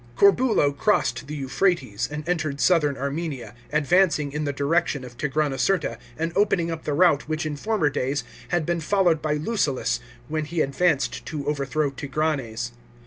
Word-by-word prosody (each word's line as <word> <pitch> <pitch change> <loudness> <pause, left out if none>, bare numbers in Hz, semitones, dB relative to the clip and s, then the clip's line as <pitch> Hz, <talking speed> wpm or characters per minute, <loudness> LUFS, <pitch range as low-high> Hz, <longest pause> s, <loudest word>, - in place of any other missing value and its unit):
Corbulo 200 - +4
crossed 180 -4 +1
the 150 - -5
Euphrates, 135 - 0
and 150 +2 -5
entered 155 -5 -1
southern 150 -6 +3
Armenia, 140 -1 -4 0.2
advancing 155 -1 +3
in 150 +1 -2
the 145 - 0
direction 145 0 0
of 125 -1 -10
Tigranocerta, 150 +6 0 0.2
and 165 +1 -2
opening 185 -4 +2
up 165 -1 -6
the 150 - 0
route 155 -3 +3
which 155 0 -1
in 155 -1 -2
former 190 -2 0
days 135 +1 -1 0.2
had 175 -3 0
been 170 +1 0
followed 175 -2 +2
by 150 -1 0
Lucullus 150 - 0 0.3
when 155 0 -2
he 160 +2 -1
advanced 140 +1 +1
to 145 -3 -4
overthrow 145 0 0
Tigranes. 135 -5 -2
150 Hz, 155 wpm, -24 LUFS, 140-170 Hz, 0.3 s, Corbulo